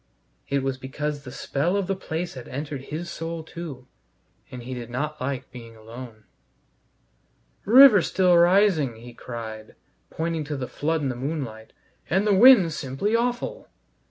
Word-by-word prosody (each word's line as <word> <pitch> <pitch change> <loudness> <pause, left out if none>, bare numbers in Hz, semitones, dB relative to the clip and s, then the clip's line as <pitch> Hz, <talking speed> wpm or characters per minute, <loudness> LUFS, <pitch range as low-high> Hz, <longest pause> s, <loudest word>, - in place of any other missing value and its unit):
It 140 -1 0
was 135 -1 -2
because 145 +2 -4
the 125 - -8
spell 145 +8 -1
of 200 - -1
the 195 +1 -1
place 175 -1 -4
had 130 -3 -9
entered 140 0 -6
his 165 +3 -5
soul 165 -1 -5
too, 155 -6 -8 0.6
and 125 -2 -9
he 130 +2 -6
did 120 -2 -7
not 150 +5 -4
like 130 -1 -4
being 115 -2 -11
alone. 110 0 -11 1.4
"River 240 -2 +8
still 180 0 +3
rising," 170 - +4
he 120 +2 -12
cried, 110 -3 -8 0.3
pointing 165 -1 -2
to 145 0 -4
the 130 -2 -4
flood 160 +1 -2
in 135 - 0
the 125 - -3
moonlight, 125 -5 -5 0.4
"and 190 +4 +2
the 210 - +3
wind's 195 -6 +7
simply 140 - -2
awful." 240 +1 -2
145 Hz, 155 wpm, -24 LUFS, 125-175 Hz, 1.4 s, River